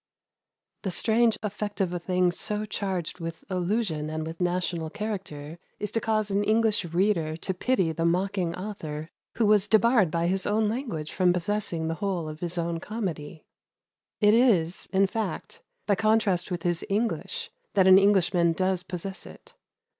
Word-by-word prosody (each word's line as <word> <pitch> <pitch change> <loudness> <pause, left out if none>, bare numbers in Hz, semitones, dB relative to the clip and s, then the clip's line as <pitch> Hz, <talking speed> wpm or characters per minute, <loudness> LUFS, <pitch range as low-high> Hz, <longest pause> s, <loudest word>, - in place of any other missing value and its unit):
The 195 - -2
strange 225 +5 +3
effect 205 0 -4
of 185 -3 0
a 175 - -2
thing 180 0 +1
so 210 +4 -3
charged 190 -5 -3
with 165 -1 -6
allusion 180 -4 -1
and 155 0 -3
with 165 +2 -7
national 175 -2 -1
character 170 -6 -5 0.2
is 210 - -4
to 225 - 0
cause 215 -2 0
an 200 +1 +1
English 220 0 +2
reader 170 -2 0
to 190 +3 -3
pity 185 -3 +1
the 165 +1 -2
mocking 180 0 0
author 165 -5 -6 0.2
who 230 - +2
was 210 -1 +4
debarred 220 -3 +4
by 170 +2 0
his 190 +2 0
own 215 +1 +2
language 215 - -3
from 180 -2 +3
possessing 180 -2 -1
the 165 - -1
whole 185 -5 -1
of 155 0 -7
his 175 +1 -3
own 170 0 -1
comedy. 170 -7 -5 0.7
It 210 -1 +5
is, 200 -8 +2
in 195 0 +4
fact, 210 +1 -4 0.2
by 205 - +3
contrast 215 -3 +2
with 175 -2 -4
his 175 -1 0
English 220 +4 -2 0.2
that 190 -2 +5
an 190 0 +8
Englishman 180 -4 +3
does 185 +1 0
possess 185 +1 -6
it. - - -15
185 Hz, 165 wpm, -27 LUFS, 170-210 Hz, 0.7 s, an